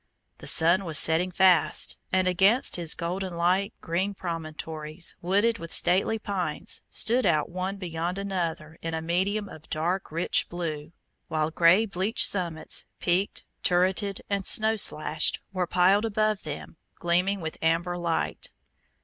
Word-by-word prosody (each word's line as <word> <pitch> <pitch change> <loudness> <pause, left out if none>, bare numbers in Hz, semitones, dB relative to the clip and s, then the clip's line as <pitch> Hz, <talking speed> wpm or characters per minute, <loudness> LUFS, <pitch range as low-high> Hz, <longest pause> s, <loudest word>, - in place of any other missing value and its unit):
The - - -9
sun 170 +4 +4
was 160 -4 0
setting 160 +5 +4
fast, 180 -2 +3 0.2
and 185 0 +2
against 195 +7 +3
his 170 -3 0
golden 180 +1 -4
light 185 +4 +1
green 190 +5 -2
promontories, 160 -1 -3
wooded 205 +6 +1
with 165 - -8
stately 185 +5 +2
pines, 185 -7 -2
stood 245 +3 +1
out 165 -4 +1
one 185 +2 -3
beyond 175 0 -4
another 170 -5 -4
in 165 0 -3
a 160 - -3
medium 195 +5 -1
of 155 - -13
dark 170 +4 -2
rich 165 +2 +1
blue, 160 -3 -5 0.4
while 155 0 -1
grey 170 +6 +4
bleached 200 +2 0
summits, 170 -5 -1
peaked, 185 +3 -1 0.2
turreted, 190 +2 +1
and 200 -2 -2
snow 220 0 +3
slashed, 155 -6 +1
were 185 -2 -1
piled 190 +5 +3
above 215 -1 0
them, 150 +1 -7 0.2
gleaming 180 +3 +1
with 160 -2 -6
amber 165 +2 0
light. 170 -2 -2
180 Hz, 140 wpm, -26 LUFS, 165-195 Hz, 0.4 s, sun